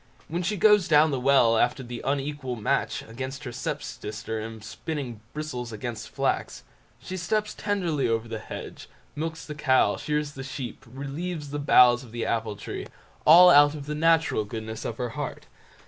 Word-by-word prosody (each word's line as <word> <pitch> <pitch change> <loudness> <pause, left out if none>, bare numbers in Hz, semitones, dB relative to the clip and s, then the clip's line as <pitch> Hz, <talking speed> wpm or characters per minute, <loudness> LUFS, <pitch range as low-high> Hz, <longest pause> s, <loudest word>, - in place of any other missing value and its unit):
When 170 +3 -2
she 205 +4 -1
goes 210 -2 +5
down 155 0 +5
the 135 - -1
well 125 -4 +4
after 125 +2 +1
the 120 -1 -7
unequal 135 -2 -2
match 110 -3 -1
against 130 +5 -6
her 125 - -5
step - - -4
sister 110 +1 -5
in 110 0 -7
spinning 125 -2 -5
bristles 135 -6 -5
against 115 +1 -6
flax; - - -2 0.4
she 185 - -7
steps 210 +4 -1
tenderly 180 -9 -1
over 115 0 0
the 110 -1 -5
hedge, - - -9 0.3
milks 160 +1 -4
the 150 - -6
cow, 130 -3 +3
shears 150 -1 -2
the 135 -2 -8
sheep, 135 -1 -6
relieves 145 +3 -5
the 145 - -3
boughs 125 -3 +6
of 120 - -13
the 120 - -2
apple 115 -2 -1
tree—all 175 - +4
out 145 -1 +7
of 145 -2 -7
the 150 - -3
natural 160 -6 +3
goodness 110 +1 -6
of 115 - -4
her 125 -1 -2
heart. - - -5
135 Hz, 175 wpm, -26 LUFS, 115-155 Hz, 0.4 s, out